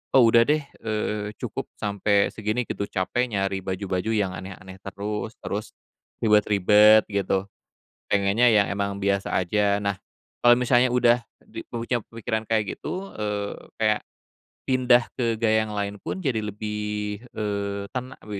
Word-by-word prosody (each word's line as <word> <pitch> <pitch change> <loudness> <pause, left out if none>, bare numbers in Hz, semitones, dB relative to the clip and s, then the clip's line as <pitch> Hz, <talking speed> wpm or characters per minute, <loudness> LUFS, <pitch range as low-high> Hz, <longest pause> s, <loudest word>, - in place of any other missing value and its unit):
“Oh 130 - +8
udah 115 +1 +6
deh, 150 +1 +3
eee, 105 -4 -4
cukup - - -5
sampai 100 0 +1
segini,” 110 +3 -1
gitu, 100 - -4
"Capek 120 +7 0
nyari 95 -2 -1
baju-baju 95 +2 -2
yang 100 -3 +1
aneh-aneh 95 0 -9
terus 105 +3 -5
terus 105 +2 -3 0.6
ribet-ribet 105 0 +6
gitu. 95 -1 0 0.7
Pengennya 100 +4 +3
ya 105 -2 +5
emang 100 0 -2
biasa 100 0 0
aja." 100 +2 +2
Nah 100 -1 0 0.5
kalau 120 0 +8
misalnya 125 0 +3
udah 120 -1 +4 0.2
di 115 - -9
mempunyai 120 +1 -1
pemikiran 110 -1 -3
kayak 110 -3 0
gitu, 195 +2 -5
eee, 105 -1 -2 0.2
kayak 110 -1 +2 0.6
pindah 125 -2 +4 0.2
ke 115 -2 +1
gaya 110 -1 +2
yang 105 - -6
lain 100 0 -3
pun 190 - -5
jadi 130 -7 0
lebih, 105 0 -4 0.2
eee, 100 -1 -2
tena 130 +1 -5
eee, 105 -2 -6
105 Hz, 145 wpm, -25 LUFS, 100-115 Hz, 0.7 s, Oh